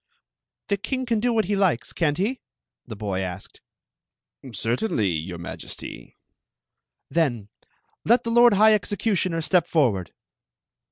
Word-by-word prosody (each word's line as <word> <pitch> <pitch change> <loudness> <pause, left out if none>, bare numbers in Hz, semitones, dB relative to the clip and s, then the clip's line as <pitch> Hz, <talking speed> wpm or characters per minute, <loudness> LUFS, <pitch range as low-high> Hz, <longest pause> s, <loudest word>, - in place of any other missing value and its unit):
"The 200 - +1
king 255 +6 -3
can 230 -3 0
do 245 +3 +1
what 220 -2 +2
he 205 +3 0
likes, 185 -11 +1
can't 150 -4 0
he?" 225 +8 -1 0.5
the 110 - -7
boy 100 -2 -3
asked. 95 0 -6 0.5
" 130 - -17
Certainly, 115 - 0
your 85 +1 -3
M^^sty." 85 - -8 1.0
"Then 120 -11 0 0.5
let 240 +2 +3
^ - - -7
Mi 240 +1 +6
k%h 205 - +1 0.2
executimier 185 -5 -1
step 175 +1 +2
^orv.^ird 115 - +1
170 Hz, 130 wpm, -24 LUFS, -, 1.0 s, Mi